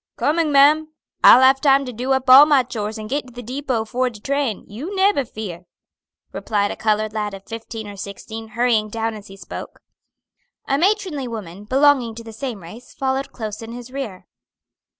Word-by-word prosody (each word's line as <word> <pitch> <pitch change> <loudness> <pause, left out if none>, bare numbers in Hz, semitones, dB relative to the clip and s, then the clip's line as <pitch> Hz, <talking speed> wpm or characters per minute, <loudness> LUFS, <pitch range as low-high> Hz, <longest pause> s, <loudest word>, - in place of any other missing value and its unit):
"Coming, 315 0 +1
ma'am. 295 +3 +5 0.4
I'll 255 - +9
have 265 +1 +5
time 275 -1 +4
to 250 - -6
do 250 +4 -3
up 265 0 -1
all 270 +3 +9
my 285 -4 +4
chores 220 -3 -5
and 215 0 -7
git 275 +3 -3
to 250 - -15
the 245 +1 -8
depot 250 -2 -2
'fore 255 +3 -1
de 225 -3 -12
train; 275 -3 -2
you 285 - -7
neber 385 -7 +2
fear," 185 -6 -8 0.6
replied 205 -2 -1
a - - -5
colored 215 0 0
lad 210 -2 -3
of 195 - -13
fifteen 225 -1 -7
or 205 - -8
sixteen, 220 +3 -8
hurrying 230 -3 +2
down 225 +1 -2
as 210 -1 -10
he 195 - -12
spoke. 185 - -9 0.9
A 275 +1 +1
matronly 370 -7 0
woman, 205 -4 -8
belonging 260 -2 +3
to 230 - -9
the 225 -1 -10
same 230 -5 -6
race, 220 +9 -12
followed 270 0 -2
close 215 -2 -6
in 225 +1 -8
his 245 +1 -9
rear. 255 -9 -6
240 Hz, 190 wpm, -21 LUFS, 215-275 Hz, 0.9 s, I'll